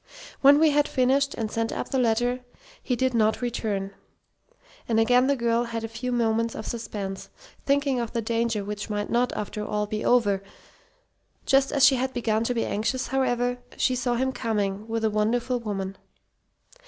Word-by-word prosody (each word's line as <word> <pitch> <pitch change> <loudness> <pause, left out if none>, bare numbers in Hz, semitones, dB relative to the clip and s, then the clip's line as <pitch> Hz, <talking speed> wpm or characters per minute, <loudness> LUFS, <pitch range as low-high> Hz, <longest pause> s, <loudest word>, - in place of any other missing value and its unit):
When 285 +1 +7
he 315 - +5
had 295 0 +3
finished, 275 +2 +1
and 220 -2 -3
sent 225 0 -1
up - - -4
the 265 - 0
letter, 245 +1 +1 0.4
he 250 - -1
did 260 +1 0
not 220 -1 +2
return, 210 -5 -2 1.0
and 225 -1 +3
again 245 +3 +4
the 280 - +3
girl 235 -1 +1
had 230 -1 -4
a - - -2
few 235 +3 -5
moments 230 -1 +1
of 220 - -6
suspense, 200 -4 -5 0.4
thinking 280 -2 +2
of 235 -1 -3
the 235 - -2
danger 230 -1 0
which 210 +1 -5
might 205 -1 -3
not, 245 +1 +2
after 210 0 -4
all, 210 0 -1
be 215 +1 -4
over. 205 -6 +3 1.0
Just 270 0 +3
as 275 - +5
she 270 - +5
had 260 +1 -2
begun 225 -2 0
to 245 - -1
be 230 - 0
anxious, 240 +4 -2
however, 245 -1 0 0.2
she 255 - +2
saw 245 -1 0
him 260 +2 0
coming 210 -4 -2
with 225 0 -1
a 220 - +2
wonderful 240 +4 0
woman. 195 -4 -4
235 Hz, 180 wpm, -25 LUFS, 215-250 Hz, 1.0 s, When